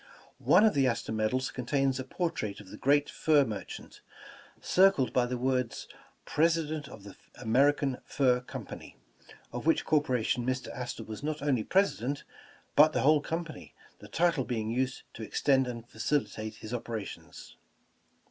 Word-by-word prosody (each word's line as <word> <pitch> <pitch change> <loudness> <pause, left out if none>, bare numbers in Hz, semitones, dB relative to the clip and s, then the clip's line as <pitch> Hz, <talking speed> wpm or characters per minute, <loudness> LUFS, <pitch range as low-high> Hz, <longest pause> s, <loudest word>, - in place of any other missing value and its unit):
One 215 - +5
of 220 - +4
the 135 -2 +3
Astor 115 -2 -2
medals 110 +4 0
contains 135 +1 0
a - - -2
portrait 130 - -3
of 100 -2 -13
the 105 - -9
great 145 +4 +3
fur 150 -3 +3
mer 105 -4 -4
chant, - - -11 0.6
circled 185 -8 +3
by 125 -1 +2
the 125 0 -2
words, 125 -1 -1 0.4
"President 155 -2 +1
of 105 - -12
the 100 -2 -11 0.2
Ameri 135 +5 +3
can 135 -3 -2
Fur 125 -3 +2
Company," 125 - -9 0.6
of 120 +5 -4
which 165 - +3
corporation 125 -5 +1
Mr. 130 +1 -2
Astor 125 -2 -5
was 110 -1 -8
not 150 0 -3
only 130 -6 +1
President, 145 - +1 0.5
but 155 +1 +7
the - - +1
whole 150 +1 +5
company, 165 +1 -6 0.2
the - - -12
title 165 -5 +1
being 110 -3 -2
used 130 +2 -1
to - - -9
extend 130 +4 +2
and 120 -1 -6
facilitate 110 -3 -2
his 110 +2 -8
operations. 115 -4 -6
130 Hz, 155 wpm, -30 LUFS, 115-150 Hz, 0.6 s, but